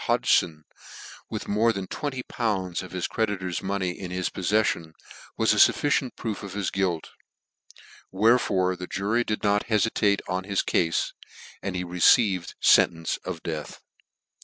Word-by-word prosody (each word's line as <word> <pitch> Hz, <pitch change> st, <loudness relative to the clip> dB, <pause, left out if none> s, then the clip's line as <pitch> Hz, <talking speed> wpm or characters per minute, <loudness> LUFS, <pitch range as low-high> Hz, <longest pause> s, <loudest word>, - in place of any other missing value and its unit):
Hodgfon, 80 Hz, -3 st, +2 dB, 0.7 s
with -, -, -5 dB
more 110 Hz, +3 st, +3 dB
than 95 Hz, -4 st, -4 dB
twen: 145 Hz, +8 st, -4 dB
y 130 Hz, -, -4 dB
pounds 95 Hz, -7 st, -2 dB
of 95 Hz, -, -10 dB
Sis 90 Hz, -1 st, -2 dB
creditors 95 Hz, -5 st, -2 dB
money 95 Hz, -2 st, -1 dB
in 90 Hz, +1 st, -7 dB
his 90 Hz, 0 st, -2 dB
poffeili 95 Hz, -3 st, 0 dB
.i', -, -, -19 dB
WHS -, -, +6 dB
a -, -, -3 dB
<i -, -, -10 dB
fmi 145 Hz, -2 st, +2 dB
nt -, -, -15 dB
proof 105 Hz, -5 st, -4 dB
of 100 Hz, -2 st, -8 dB
his 100 Hz, -2 st, -2 dB
guilt, 90 Hz, -4 st, -1 dB, 1.0 s
wherefore 100 Hz, -3 st, +3 dB
r;. 90 Hz, -, -4 dB
jurv 100 Hz, +5 st, -1 dB
ia.; 105 Hz, -1 st, +1 dB
t 110 Hz, +1 st, -2 dB
..e -, -, +5 dB
fitate 105 Hz, -2 st, +1 dB
on 95 Hz, 0 st, -2 dB
his 100 Hz, -1 st, 0 dB
cale, 80 Hz, -1 st, +1 dB, 0.7 s
and 95 Hz, -2 st, -4 dB
he 90 Hz, -, -2 dB
received 90 Hz, +1 st, +3 dB
fentence 80 Hz, -1 st, +4 dB
of -, -, -7 dB
death. 80 Hz, -3 st, -5 dB
95 Hz, 165 wpm, -25 LUFS, 90-105 Hz, 1.0 s, WHS